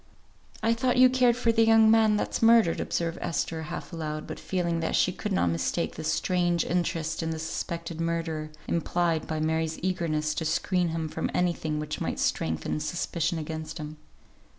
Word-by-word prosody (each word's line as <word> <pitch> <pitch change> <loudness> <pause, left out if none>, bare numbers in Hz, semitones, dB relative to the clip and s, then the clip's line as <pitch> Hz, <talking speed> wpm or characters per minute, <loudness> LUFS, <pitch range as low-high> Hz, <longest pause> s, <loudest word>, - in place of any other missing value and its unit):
"I 225 +1 +4
thought 250 +2 +1
you 255 0 +7
cared 250 -2 +4
for 235 -2 +2
the 225 0 +4
young 225 -1 +6
man 220 -1 +5
that's - - -2
murdered," 225 -6 +5
observed 165 -1 -2
Esther, 165 -1 -2
half 160 +3 -7
aloud; 155 -2 -4
but - - -7
feeling 170 -3 -1
that 165 - -1
she 185 - +3
could 210 +3 -5
not 90 - +2
mistake 85 - -1
this - - -2
strange 175 -2 +1
interest 170 -2 -1
in 160 - -2
the 160 - -3
suspected 165 +1 -4
murderer, 165 -2 -2 0.2
implied 170 -1 0
by 155 -1 -2
Mary's 160 0 0
eagerness 160 -5 0
to 160 - -3
screen 175 +3 +1
him 165 -1 -2
from 160 +1 -3
any 180 -1 +2
thing 155 -2 -3
which 150 0 -4
might - - -2
strengthen 80 - -1
suspicion 170 +1 -2
against 160 0 -5
him. 155 -1 -7
165 Hz, 180 wpm, -27 LUFS, 160-185 Hz, 0.2 s, you